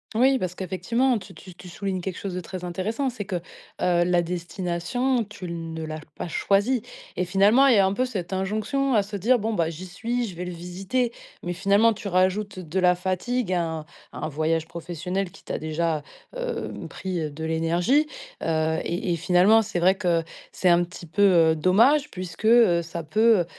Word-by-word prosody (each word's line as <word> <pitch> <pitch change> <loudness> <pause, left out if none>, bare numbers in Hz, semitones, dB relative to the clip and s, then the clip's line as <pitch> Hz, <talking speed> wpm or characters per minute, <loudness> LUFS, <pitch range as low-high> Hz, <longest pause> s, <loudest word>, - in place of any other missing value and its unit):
Oui, 260 +3 +4
parce 180 -3 -3
qu'effectivement, 230 +7 0
tu 190 -1 -13
tu 185 +3 -12
tu 180 +1 -12
soulignes 190 0 -3
quelque 185 0 -4
chose 195 -2 -5
de 180 - -3
très 180 0 -7
intéressant, 215 +10 -2
c'est 220 -4 -6
que, 190 - -3
heu, 175 - -2 0.6
la 175 0 +2
destination, 180 +8 -1
tu 200 -3 -10
ne 165 -1 -5
l'as 155 0 -5 0.2
pas - - -5
choisie 205 +8 +1 0.3
et 180 - 0
finalement, 200 +9 +5
il 255 - +6
y - - +4
a 195 - +5
un 190 - +1
peu 255 +5 +1
cette 195 -8 -5
injonction 215 +8 0
à 210 - +4
se 205 +1 -7
dire: 230 +6 +3
«Bon, 220 +2 -1
bah, 165 -5 +1
j'y 170 +3 -7
suis, 235 +7 -2
je 190 -6 -7
vais 180 +2 -5
le 180 - -5
visiter». 190 +8 -2 0.3
Mais 175 - -2
finalement, 200 +5 +3
tu 210 -1 -7
rajoutes 190 +2 +1
de 180 0 -3
la 180 -1 +4
fatigue, 185 +4 -1
à 175 - +2
un 160 -1 -3 0.3
à - - -10
un - - -3
voyage 160 +2 0
professionnel 175 +3 -4
qui - - -17
t'a - - -4
déjà, 155 0 -1 0.3
hem, - - -4
pris 175 -5 -3
de 155 +2 -6
l'énergie, 170 - +2 0.3
heu 160 0 0
et 175 +1 -1
et - - +1
finalement, 180 +6 +5
c'est 220 -3 -4
vrai 185 +2 +5
que 175 -3 0 0.3
c'est 185 - +1
un 175 0 +5
petit 175 0 -9
peu, 170 +5 -2 0.3
heu, - - +1
dommage 230 - +4
puisque, 185 +1 -7
heu, 225 -7 +6
ça 170 0 -6
peut, 215 +5 +4
heu - - -2
185 Hz, 205 wpm, -25 LUFS, 170-215 Hz, 0.6 s, il